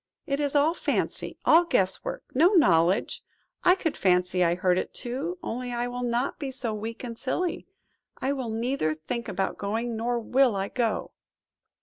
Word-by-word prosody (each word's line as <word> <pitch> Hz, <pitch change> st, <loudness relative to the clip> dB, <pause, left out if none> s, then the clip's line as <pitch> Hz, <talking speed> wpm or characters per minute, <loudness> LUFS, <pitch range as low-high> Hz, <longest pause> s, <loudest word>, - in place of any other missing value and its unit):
It 275 Hz, 0 st, -1 dB
is 290 Hz, -1 st, -1 dB
all 295 Hz, +3 st, +4 dB
fancy, -, -, -2 dB
all 335 Hz, +2 st, +7 dB
guess 190 Hz, -, +1 dB
work; -, -, -5 dB
no 310 Hz, +7 st, +5 dB
knowledge! 180 Hz, -, +3 dB, 0.4 s
I 360 Hz, -, +6 dB
could 325 Hz, -5 st, -2 dB
fancy 180 Hz, -1 st, +2 dB
I 170 Hz, 0 st, +2 dB
heard 180 Hz, 0 st, +2 dB
it -, -, -5 dB
too, 275 Hz, +9 st, -4 dB
only 245 Hz, +2 st, -4 dB
I 240 Hz, 0 st, -1 dB
will 245 Hz, 0 st, -5 dB
not 245 Hz, +2 st, -1 dB
be 280 Hz, -, -3 dB
so 255 Hz, -4 st, -3 dB
weak 225 Hz, +3 st, -6 dB
and 235 Hz, -2 st, -5 dB
silly; 350 Hz, +10 st, -2 dB, 0.5 s
I 270 Hz, +2 st, 0 dB
will 260 Hz, -4 st, -4 dB
neither 225 Hz, -, -1 dB
think 235 Hz, +10 st, -5 dB
about 190 Hz, +1 st, -2 dB
going, 225 Hz, +4 st, -2 dB
nor 235 Hz, +2 st, -1 dB
will 250 Hz, 0 st, +3 dB
I 195 Hz, 0 st, -2 dB
go." 235 Hz, -4 st, -1 dB
240 Hz, 180 wpm, -27 LUFS, 200-275 Hz, 0.5 s, all